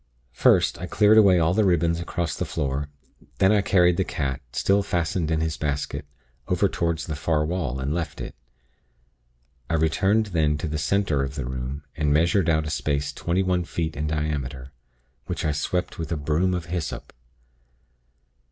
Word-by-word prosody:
"First, - - +3
I - - -5
cleared 110 +1 +5
away 100 -4 +6
all 85 0 +3
the 110 +3 +3
ribbons 85 -3 +2
across 85 -1 -3
the - - -2
floor; 70 -1 -2 0.5
then 95 0 +4
I 105 -1 +4
carried 90 -3 +3
the 95 - +2
cat 70 -5 -3
still 100 +10 +2
fastened 85 -3 -1
in 80 -1 +1
its 80 -1 -2
basket 70 -1 -3 0.4
over - - +2
toward 85 -1 -1
the 80 0 -4
far 75 +1 0
wall, 75 -6 -2
and 70 +3 -2
left 80 -3 -3
it. - - -6 1.4
I - - +1
returned 95 +7 +2
then 75 -3 +2
to 75 - -3
the 75 0 -3
center 80 -3 +1
of 70 0 -3
the 70 -4 -3
room, 65 +3 -5
and 75 -2 0
measured 85 +4 +3
out 80 -1 +2
a 75 - -3
space 70 -2 -1
twenty 90 +3 0
one 90 -1 +1
feet 80 -2 -3
in 75 +2 -2
diameter, 70 -4 -3 0.6
which - - -3
I 75 - +2
swept 90 +5 -2
with 80 +1 -4
a 80 - 0
'broom 80 +6 +1
of 85 -2 -4
hyssop.' 85 -2 -5
80 Hz, 180 wpm, -24 LUFS, 75-90 Hz, 1.4 s, away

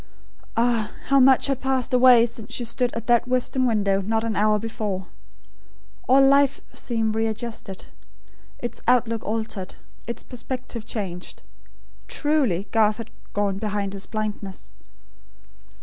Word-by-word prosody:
Ah, 230 -2 +1 0.2
how 275 0 +5
much 265 0 +6
had 275 -2 0
passed 265 -1 0
away 250 -2 +7
since 225 -2 -8
she 240 - -2
stood 240 +1 -1
at 230 -1 -4
that 240 0 +3
western 255 +1 +1
window, 200 -4 +1
not 220 +3 0
an 225 -2 -2
hour 215 0 +3
before. 210 -4 -4 1.0
All 270 +1 +7
life 275 0 +4
seemed 225 -2 -1
readjusted; 220 -3 -4 0.7
its 240 - -6
outlook 235 -2 +2
altered; 215 -3 -4 0.3
its 235 - -5
perspective 250 -2 -7
changed. 185 -5 -6 0.6
Truly 265 - 0
Garth 215 -1 +3
had 230 - -8 0.2
"gone 200 -1 0
behind 205 -2 -2
his 200 -1 -7
blindness." 210 -3 -5
225 Hz, 130 wpm, -24 LUFS, 210-250 Hz, 1.0 s, away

